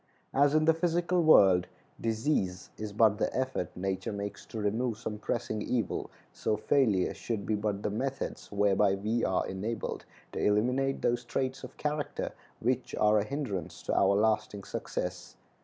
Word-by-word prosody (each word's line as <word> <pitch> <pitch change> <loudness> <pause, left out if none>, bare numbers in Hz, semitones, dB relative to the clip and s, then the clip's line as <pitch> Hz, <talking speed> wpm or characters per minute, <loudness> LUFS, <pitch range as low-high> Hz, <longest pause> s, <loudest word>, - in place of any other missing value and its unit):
As 145 +2 +4
in 155 0 +4
the 160 - +6
physical 175 +2 +1
world, 95 - +6 0.3
disease 110 -5 -1
is 105 -1 -5
but 105 0 +4
the - - +1
effort 130 -9 -1
nature 95 +2 -2
makes 100 0 -5
to - - -7
remove 110 +2 0
some 110 -2 -5
pressing 110 -1 -2
evil, 115 -4 -1 0.2
so 105 - -1
failure 110 -6 +2
should 110 -4 -4
be 110 - 0
but 105 -1 -1
the 105 - 0
methods 135 +5 -3
whereby 100 -1 +3
we 110 +4 -1
are 95 - +1
enabled 105 +4 -4 0.3
to - - -4
eliminate 125 +6 +1
those 120 0 +1
traits 130 +2 -2
of 130 - -9
character 150 -1 -2 0.3
which - - -1
are 105 0 +4
a - - +1
hindrance 105 - -4
to - - -1
our 100 0 +4
lasting 105 -1 +1
success. - - -4
110 Hz, 160 wpm, -30 LUFS, 100-130 Hz, 0.3 s, the